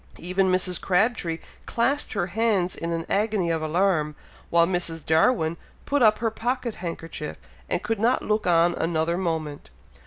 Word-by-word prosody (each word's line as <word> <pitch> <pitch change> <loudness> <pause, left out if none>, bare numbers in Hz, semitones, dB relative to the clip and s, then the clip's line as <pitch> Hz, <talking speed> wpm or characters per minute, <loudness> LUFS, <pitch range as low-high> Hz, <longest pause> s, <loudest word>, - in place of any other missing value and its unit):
Even 185 +2 +1
Mrs. 185 0 0
Crabtree 185 -3 +1 0.3
clasped 275 +5 0
her 195 - 0
hands 200 -2 0
in 170 0 -4
an 165 -1 -2
agony 205 -4 +1
of 165 -1 -1
alarm, 155 -2 +1 0.3
while 170 0 +5
Mrs. 170 -3 -2
Darwin 160 0 +2 0.3
put 285 -1 +1
up 215 -2 +5
her 225 -1 -1
pocket 240 +1 -2
handkerchief, 165 -2 -5 0.3
and - - -1
could 225 -3 -1
not 235 +4 +2
look 215 -2 0
on 170 0 +4
another 165 0 0
moment. 160 - -3
180 Hz, 155 wpm, -25 LUFS, 165-215 Hz, 0.3 s, while